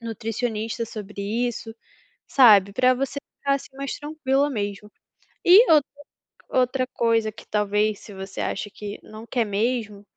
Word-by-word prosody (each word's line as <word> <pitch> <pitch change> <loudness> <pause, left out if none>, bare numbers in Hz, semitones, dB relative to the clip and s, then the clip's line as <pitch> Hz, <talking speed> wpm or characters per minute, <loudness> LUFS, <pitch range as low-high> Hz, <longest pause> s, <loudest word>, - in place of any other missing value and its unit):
nutricionista 225 0 -3
sobre 210 -2 -8
isso, 225 +1 -3 0.5
sabe, 205 -7 +6
para 255 +3 +4
você 275 +2 -3 0.2
ficar, 280 0 +1
assim, 270 -1 -7
mais 275 -1 -4
tranquila 290 -2 0
mesmo. 210 -3 -4 0.6
E 395 +8 +8
outra 295 -3 +5 0.6
outra 255 0 +1
coisa 230 -3 +1
que, 220 - -14
talvez, 210 0 0
se 210 - -12
você 195 0 -6
acha 205 - -3
que 205 0 -8
não 215 +1 -11
quer 240 -3 0
mesmo 210 0 -2
225 Hz, 140 wpm, -24 LUFS, 210-255 Hz, 0.6 s, E